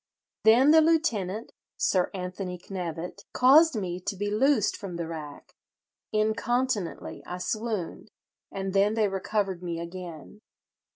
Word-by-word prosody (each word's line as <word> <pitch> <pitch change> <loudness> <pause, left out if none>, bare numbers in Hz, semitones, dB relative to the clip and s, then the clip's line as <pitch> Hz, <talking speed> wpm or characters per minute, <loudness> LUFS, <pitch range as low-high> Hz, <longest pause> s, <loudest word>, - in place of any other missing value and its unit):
Then 245 +6 +7
the 320 0 +7
lieutenant 235 - +1 0.3
(Sir 185 -2 +2
Anthony 180 -1 -5
Knevet) 180 +1 -6
caused 290 +4 +6
me 180 -4 -3
to 190 +2 -4
be 205 +2 -2
loosed 245 0 +2
from 190 -4 -7
the 170 -1 -4
rack. 155 -3 -8 0.6
Incontinently 220 -1 -1
I 180 - -4
swooned, 215 -1 -3 0.4
and 195 -1 -4
then 200 +2 +3
they 220 -2 +3
recovered 195 -1 -2
me 170 -2 -4
again. 170 +2 -8
195 Hz, 125 wpm, -27 LUFS, 180-220 Hz, 0.6 s, Then